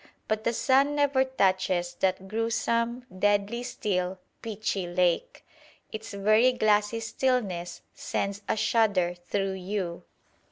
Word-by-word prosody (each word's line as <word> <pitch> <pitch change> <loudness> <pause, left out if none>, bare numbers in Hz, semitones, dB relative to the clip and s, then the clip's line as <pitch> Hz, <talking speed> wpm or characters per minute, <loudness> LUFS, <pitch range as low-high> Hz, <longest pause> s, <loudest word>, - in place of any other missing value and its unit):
But 215 0 -1
the 235 - +3
sun 275 +4 +3
never 285 -2 +3
touches 185 -7 +1
that 190 0 0
gruesome, 230 +3 -1
deadly 205 +3 +1
still, 190 -6 -2 0.2
pitchy 210 -4 -3
lake. 180 - 0 0.5
Its 220 0 -7
very 215 +5 +4
glassy 215 -1 +2
stillness 225 -7 -1
sends 200 +1 -3
a - - +1
shudder 205 -6 +2
through 195 +3 -2
you. 185 -2 -4
210 Hz, 115 wpm, -27 LUFS, 190-230 Hz, 0.5 s, very